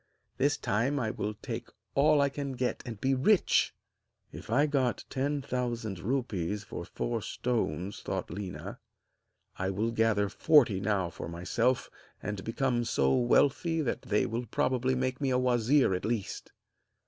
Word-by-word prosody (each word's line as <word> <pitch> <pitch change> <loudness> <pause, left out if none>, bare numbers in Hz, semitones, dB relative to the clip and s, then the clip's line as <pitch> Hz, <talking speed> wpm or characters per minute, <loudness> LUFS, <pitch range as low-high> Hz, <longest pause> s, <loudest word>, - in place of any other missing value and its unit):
This 145 +3 +2
time 125 +8 0
I 110 -3 -1
will 105 0 -3
take - - -5 0.2
all 150 +1 +4
I 140 - +3
can 140 -1 -4
get 125 0 -1
and 115 -4 -6
be 135 +4 +2
rich!' 170 +10 +3 0.6
'If - - -10
I 135 +6 +4
got 135 -5 0
ten 140 +1 -1
thousand 120 -7 -3
rupees 105 -4 -2
for - - -7
four - - -3
stones,' 100 -6 -2
thought - - -3
Léna, 95 +1 -6 0.8
'I 95 0 0
will 105 +4 -1
gather 115 -3 +2
forty 120 -4 +4
now 95 -3 0
for - - -7
myself, 95 +9 0 0.3
and 100 0 -4
become 120 +1 0
so 70 - +2
wealthy 145 +7 +3
that 130 - -2
they 105 0 +1
will 115 +2 -3
probably 130 +3 +1
make 130 +1 -1
me 135 - +1
a 125 - +2
wazir 125 -1 +3
at 90 - -2
least!' 110 -3 -3
120 Hz, 155 wpm, -30 LUFS, 105-135 Hz, 0.8 s, all